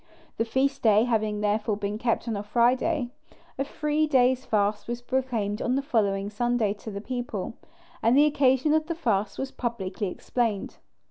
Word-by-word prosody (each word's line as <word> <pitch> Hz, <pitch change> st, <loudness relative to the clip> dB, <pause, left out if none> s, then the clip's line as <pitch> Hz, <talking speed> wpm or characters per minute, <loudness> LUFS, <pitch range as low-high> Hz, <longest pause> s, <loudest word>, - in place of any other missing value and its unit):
The 225 Hz, -, +1 dB
feast 270 Hz, +4 st, 0 dB
day 215 Hz, -1 st, +5 dB
having 215 Hz, -3 st, 0 dB
therefore 210 Hz, 0 st, 0 dB
been 205 Hz, +1 st, -3 dB
kept 235 Hz, 0 st, 0 dB
on 225 Hz, -, -1 dB
a 200 Hz, -, -2 dB
Friday, 245 Hz, +5 st, +1 dB, 0.5 s
a -, -, +2 dB
three 300 Hz, +2 st, 0 dB
days' 260 Hz, -2 st, +3 dB
fast 210 Hz, -1 st, 0 dB
was 240 Hz, 0 st, -3 dB
proclaimed 245 Hz, -5 st, -2 dB
on 250 Hz, -, +1 dB
the 275 Hz, -, 0 dB
following 205 Hz, -7 st, 0 dB
Sunday 240 Hz, -1 st, +1 dB
to -, -, -7 dB
the 200 Hz, -1 st, -5 dB
people, 240 Hz, -5 st, -4 dB, 0.5 s
and 235 Hz, +4 st, +4 dB
the 295 Hz, -, +7 dB
occasion 275 Hz, 0 st, +3 dB
of 315 Hz, 0 st, +1 dB
the 335 Hz, -, -2 dB
fast 215 Hz, -, 0 dB
was 265 Hz, 0 st, -3 dB
publicly 210 Hz, -4 st, -3 dB
explained. 220 Hz, +2 st, -2 dB
235 Hz, 175 wpm, -26 LUFS, 210-260 Hz, 0.5 s, the